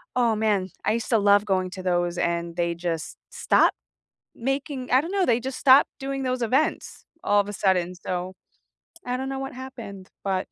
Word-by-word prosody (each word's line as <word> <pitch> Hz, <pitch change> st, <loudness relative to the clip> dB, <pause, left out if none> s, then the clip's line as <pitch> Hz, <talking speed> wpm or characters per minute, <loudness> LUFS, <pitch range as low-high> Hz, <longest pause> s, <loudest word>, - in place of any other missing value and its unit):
oh, 235 Hz, -3 st, +3 dB
man, 210 Hz, -3 st, +1 dB, 0.2 s
I 210 Hz, -, +3 dB
used 230 Hz, 0 st, -3 dB
to 230 Hz, -, +4 dB
love 205 Hz, -1 st, +4 dB
going 185 Hz, -2 st, 0 dB
to 185 Hz, 0 st, -7 dB
those 175 Hz, -1 st, 0 dB
and 170 Hz, 0 st, -1 dB
they 170 Hz, -1 st, 0 dB
just 170 Hz, -2 st, -4 dB
stopped -, -, +3 dB, 0.6 s
making 270 Hz, +1 st, -3 dB
I 255 Hz, +2 st, +5 dB
don't 330 Hz, +4 st, -6 dB
know, 390 Hz, -2 st, +2 dB
they 235 Hz, -4 st, +3 dB
just 260 Hz, +2 st, -5 dB
stopped 270 Hz, 0 st, +6 dB
doing 270 Hz, 0 st, -3 dB
those 255 Hz, -1 st, -1 dB
events 260 Hz, +7 st, 0 dB, 0.2 s
all 205 Hz, -, +3 dB
of 200 Hz, -, 0 dB
a -, -, -5 dB
sudden, 180 Hz, -2 st, +1 dB
so, 180 Hz, 0 st, -4 dB, 0.7 s
I 250 Hz, -, -1 dB
don't 265 Hz, +1 st, -4 dB
know 270 Hz, -, -3 dB
what 270 Hz, 0 st, -5 dB
happened, 240 Hz, -7 st, -9 dB
but 190 Hz, -2 st, -1 dB
215 Hz, 195 wpm, -25 LUFS, 185-260 Hz, 0.7 s, stopped